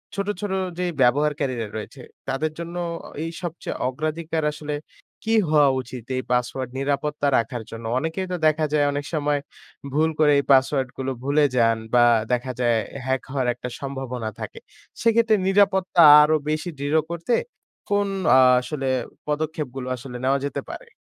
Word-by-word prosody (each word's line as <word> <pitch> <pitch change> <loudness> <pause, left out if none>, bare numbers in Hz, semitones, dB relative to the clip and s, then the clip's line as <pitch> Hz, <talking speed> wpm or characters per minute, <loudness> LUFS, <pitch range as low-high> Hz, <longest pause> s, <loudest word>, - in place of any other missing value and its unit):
ছোট, 200 0 -2
ছোট 205 -2 -3 0.3
যেই 180 -1 -1
ব্যবহারকারীরা 130 -2 +1
রয়েছে, 120 +5 -8 0.3
তাদের 135 +4 -1
জন্য 170 +1 -6 0.5
এই 165 - -3
সবচেয়ে 175 -1 -5
অগ্রাধিকার 155 +4 -3
আসলে 150 0 -6 0.5
কি 225 - 0 0.2
হওয়া 150 -2 +5
উচিত? 125 -1 -9
এই 130 - -2
পাসওয়ার্ড 125 +1 -1
নিরাপত্তা 145 +1 -1
রাখার 115 0 -2
জন্য? 115 0 -8
অনেকেই 165 +5 -3
তো - - 0
দেখা 155 0 +2
যায় 145 -1 +3
অনেক 145 0 -3
সময় 145 -2 +1 0.5
ভুল 155 +2 +3
করে 150 -1 +5
এই - - -1
পাসওয়ার্ডগুলো 135 -1 +2
ভুলে 145 +2 +3
যান, 115 -1 +4 0.2
বা 120 -1 +6 0.3
দেখা 125 +1 -1
যায় 120 -2 +2 0.3
হ্যাক 130 0 0
হওয়ার 130 -3 -1
একটা 125 - -7
সম্ভাবনা 130 -4 -4
থাকে। - - -7 0.4
সেক্ষেত্রে 230 -1 +4
নিরাপত্তা 190 -2 +3 0.2
আরও 155 +1 +4
বেশি 155 +3 -1
দৃঢ় 145 +3 +2
করতে, 170 +7 -2 0.6
কোন 205 0 +2 0.3
আ - - +7 0.2
আসলে 135 0 -4 0.4
পদক্ষেপগুলো 150 -4 -3
আসলে 125 0 -8
নেওয়া 135 +1 +2
যেতে 140 - -3
পারে? - - -8
145 Hz, 150 wpm, -23 LUFS, 130-160 Hz, 0.6 s, আ